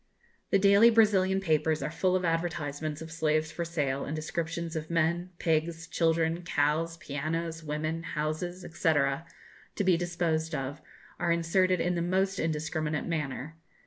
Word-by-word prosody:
The - - +4
daily 200 +3 +7
Brazilian 200 -4 +4
papers 155 -4 +1
are 150 - -2
full 185 +3 +1
of 185 -1 0
advertisements 155 -2 -2
of 160 - -10
slaves 155 -1 0
for 170 - -3
sale, 145 -5 -1
and 150 - -4
descriptions 165 +1 -3
of 155 0 -4
men, 170 +2 +1
pigs, 165 0 0
children, 165 0 +1
cows, 165 0 0
pianos, 165 +3 -3
women, 155 +2 -2
houses, 165 +3 -3
&c., 165 -1 +1
to 145 +7 -3
be 185 -3 +4
disposed 170 -2 -1
of, 140 +3 -4 0.4
are 170 0 +1
inserted 180 +2 +2
in 180 +1 +1
the 170 - -1
most 190 +3 +1
indiscriminate 155 -1 -1
manner. 150 -1 -3
165 Hz, 145 wpm, -29 LUFS, 155-175 Hz, 0.4 s, daily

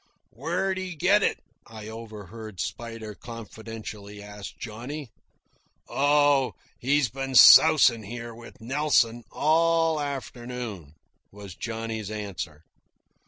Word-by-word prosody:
"Where'd 190 -1 -2
he 185 -2 -5
get 200 +7 +4
it?" - - +1 0.3
I 110 -1 -10
overheard 110 -2 -9
Spider 115 -1 -5
confidentially 110 -2 -9
ask 105 0 -9
Johnny. 125 +4 -7 0.8
"Oh, 145 -1 +3 0.3
he's 140 +2 +2
been 135 +1 -4
sousin' 120 -2 +8
here 115 +3 -7
with 120 +3 -13
Nelson 120 -2 +1
all 165 0 +2
afternoon," 120 - -6 0.4
was 100 -2 -10
Johnny's 110 0 -5
answer. 100 -7 -6
115 Hz, 100 wpm, -26 LUFS, 110-140 Hz, 0.8 s, sousin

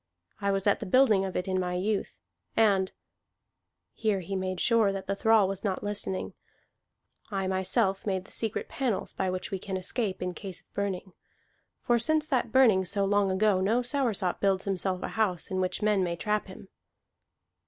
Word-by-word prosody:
I 200 - 0
was 195 -1 -1
at 205 - +3
the - - -5
building 215 -3 +4
of 190 - -5
it 180 - -2
in 185 0 0
my 180 -1 -2
youth, 200 +3 -2 0.4
and" 195 -4 +3 1.0
(here 210 -4 0
he 195 +3 -5
made 185 -1 -2
sure 225 -2 +4
that 195 -1 -5
the 195 - -1
thrall 220 -1 +4
was 195 0 -4
not 195 -3 -2
listening) 205 -2 -3 1.0
"I 195 -2 -2
myself 190 +2 +1
made 190 -2 -1
the - - -17
secret 225 -2 -2
panels 255 -7 -2
by 190 - -1
which 185 0 -4
we 195 - -2
can 190 0 -4
escape 195 +1 -2
in 180 0 -2
case 190 -1 -6
of - - -35
burning. 195 -2 -3 0.7
For 240 -2 +3
since 310 +5 +2
that 245 -5 0
burning 225 -7 +5
so 200 +2 0
long 200 0 +2
ago, 190 0 +2
no 225 +6 +2
Soursop 240 -8 0
builds 195 -1 +1
himself 190 -1 -1
a - - -3
house 200 -7 0
in 185 0 0
which 185 +3 -2
men 210 -3 +3
may 170 -1 -1
trap 210 +4 -1
him." 190 0 -12
195 Hz, 185 wpm, -28 LUFS, 185-215 Hz, 1.0 s, burning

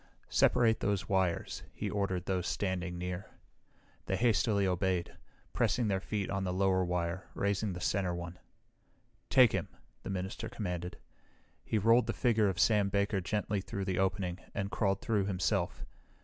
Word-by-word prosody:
"Separate 115 -2 +4
those 100 -3 -1
wires," 95 -3 0
he - - -3
ordered 95 -3 -1
those 90 -2 -1
standing 90 -3 -2
near. 90 +1 -4 0.8
They 95 - +1
hastily 110 -2 +2
obeyed, 90 -1 0 0.4
pressing 120 -4 +1
their 95 -1 +1
feet 100 +1 -3
on 95 -1 -1
the 90 - -1
lower 95 0 +2
wire, 90 0 -2
raising 100 0 0
the 90 - -6
center 95 -1 0
one. 85 0 -7 0.9
"Take 130 -4 +7
him!" - - -1 0.3
the - - -7
minister 95 +4 -4
commanded. 90 -5 -4 0.7
He 110 - -1
rolled 115 +4 +4
the - - 0
figure 110 -4 +2
of 95 0 -3
Sam 105 -3 +4
Baker 100 0 +1
gently 105 +1 -1
through 100 0 -4
the 95 -2 -1
opening 95 -1 0 0.2
and 100 0 -2
crawled 100 -2 0
through 105 -4 +1
himself. 95 -4 -1
95 Hz, 155 wpm, -32 LUFS, 90-105 Hz, 0.9 s, Take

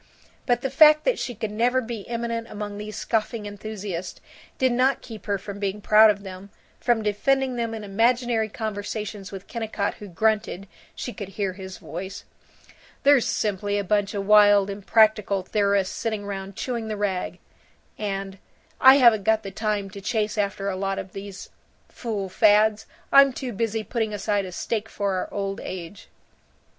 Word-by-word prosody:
But 245 -1 +2
the 270 - -2
fact 305 +2 +7
that - - +1
she 245 0 -4
could 220 -1 -4
never 240 +4 +2
be 230 -4 -6
eminent 230 -1 -3
among 205 -1 -6
these 210 0 -6
scoffing 225 -1 -1
enthusiasts 205 -3 -6 0.4
did 260 -1 +2
not 255 +3 +2
keep 220 -3 -10
her 200 -1 +1
from 200 +1 -8
being 200 0 -2
proud 215 +1 +6
of 200 -1 0
them, 190 +1 -9 0.3
from 240 -3 +1
defending 260 +5 +1
them 230 -1 -2
in 220 - -7
imaginary 225 +2 +1
conversations 210 -1 -5
with 195 -1 -8
Kennicott, 220 -3 -3
who 210 - -8
grunted 205 0 0 0.3
(she 245 - -5
could 200 -4 -7
hear 195 -1 -2
his 190 0 -9
voice), 190 +3 -7 0.8
"They're 280 -2 +6
simply 205 -2 -1
a 205 - 0
bunch 205 +1 0
of 200 -1 -2
wild 205 -1 +6
impractical 205 -1 +2
theorists 200 -1 +1
sittin' 215 -3 -3
round 195 -1 -6
chewing 235 -2 -3
the 215 -1 -3
rag," 195 -3 -2 0.6
and 195 -2 -4 0.4
"I 265 +1 +9
haven't 235 -6 +6
got 220 +1 +2
the 195 - -6
time 205 -1 -2
to 200 - -9
chase 210 0 -1
after 200 -1 -1
a 195 - -1
lot 195 +1 -2
of 190 -1 -6
these 195 0 -8 0.4
fool 215 -5 -4
fads; 210 +2 +3 0.2
I'm 275 -1 +7
too 250 -1 -5
busy 225 +1 -1
putting 220 -2 -2
aside 205 0 0
a 185 - -7
stake 220 +4 -3
for 200 -2 -2
our 185 - -3
old 195 -1 -3
age." 185 +1 -8
210 Hz, 170 wpm, -24 LUFS, 195-225 Hz, 0.8 s, I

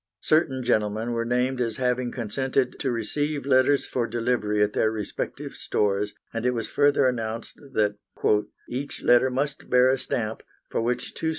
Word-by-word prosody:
Certain 140 -5 +2
gentlemen 110 0 0
were 115 0 -1
named 125 +2 0
as 115 -3 -1
having 125 -1 0
consented 130 +3 -1
to 135 - 0
receive 145 +6 -1
letters 135 +1 +4
for 120 -2 -1
delivery 115 -3 +1
at 105 - 0
their 110 - +2
respective 110 -2 -4
stores, 105 0 0 0.2
and 115 0 -3
it 125 0 +1
was 115 - -2
further 145 -1 +3
announced 115 -2 -2
that 105 -2 +1 0.7
"each 135 +3 -5
letter 125 +2 +5
must 140 +3 -3
bear 125 +1 +5
a 135 - 0
stamp, 110 -3 -3 0.3
for - - 0
which 120 +2 -2
2 - - -10
c. 160 - 0
125 Hz, 170 wpm, -25 LUFS, 110-130 Hz, 0.7 s, letter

